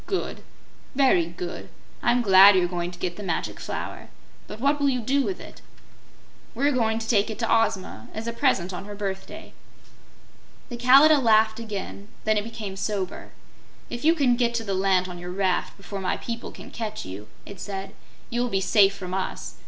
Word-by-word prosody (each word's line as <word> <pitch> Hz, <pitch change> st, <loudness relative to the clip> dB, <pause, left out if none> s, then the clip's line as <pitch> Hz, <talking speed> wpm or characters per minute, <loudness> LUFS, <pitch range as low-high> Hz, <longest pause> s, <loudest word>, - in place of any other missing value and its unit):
"Good! 385 Hz, -, -3 dB, 0.5 s
Very 255 Hz, -12 st, +4 dB
good! 175 Hz, -, -7 dB, 0.3 s
I'm 245 Hz, 0 st, +2 dB
glad 195 Hz, -1 st, +8 dB
you're 180 Hz, -1 st, +3 dB
going 175 Hz, -1 st, -3 dB
to 175 Hz, -, -11 dB
get 175 Hz, -1 st, -4 dB
the -, -, -7 dB
Magic 185 Hz, -5 st, -3 dB
Flower. -, -, -6 dB, 0.4 s
But 215 Hz, -, -9 dB
what 285 Hz, +4 st, +2 dB
will 285 Hz, -1 st, +3 dB
you 255 Hz, -2 st, 0 dB
do 270 Hz, +5 st, +1 dB
with 370 Hz, +6 st, -3 dB
it?" -, -, -12 dB, 0.9 s
"We're 280 Hz, +5 st, +2 dB
going 225 Hz, -4 st, +1 dB
to 225 Hz, -1 st, -5 dB
take 210 Hz, -3 st, +2 dB
it 220 Hz, -, -5 dB
to 230 Hz, -, -1 dB, 0.2 s
Ozma, 185 Hz, -, -5 dB
as 220 Hz, +1 st, -6 dB
a 235 Hz, -, -3 dB
present 195 Hz, -8 st, +1 dB
on 180 Hz, +2 st, -6 dB
her 205 Hz, 0 st, -8 dB
birthday." 195 Hz, -2 st, -6 dB, 1.2 s
The 240 Hz, -, -5 dB
Kalidah 275 Hz, +5 st, +7 dB
laughed 220 Hz, -1 st, +4 dB
again; 205 Hz, -2 st, -6 dB, 0.2 s
then 215 Hz, 0 st, +2 dB
it 210 Hz, -, 0 dB
became 215 Hz, -3 st, -6 dB
sober. 195 Hz, -1 st, -4 dB, 0.6 s
"If 240 Hz, -, -5 dB
you 325 Hz, +2 st, +5 dB
get 245 Hz, -5 st, +2 dB
to 230 Hz, -, -1 dB
the 200 Hz, -3 st, -2 dB
land 190 Hz, -1 st, +2 dB
on 180 Hz, -1 st, -8 dB
your 175 Hz, 0 st, -7 dB
raft 185 Hz, -1 st, -1 dB
before 195 Hz, 0 st, -7 dB
my 185 Hz, -, -1 dB
people 235 Hz, -1 st, -6 dB
can -, -, -12 dB
catch 215 Hz, -2 st, -5 dB
you," 95 Hz, +3 st, -8 dB, 0.2 s
it 200 Hz, -3 st, -10 dB
said, 195 Hz, 0 st, -6 dB, 0.4 s
"you 240 Hz, 0 st, 0 dB
will 245 Hz, -, 0 dB
be 195 Hz, -, +1 dB
safe 195 Hz, 0 st, +4 dB
from 185 Hz, -2 st, -7 dB
us. 190 Hz, 0 st, -4 dB
210 Hz, 190 wpm, -25 LUFS, 190-235 Hz, 1.2 s, glad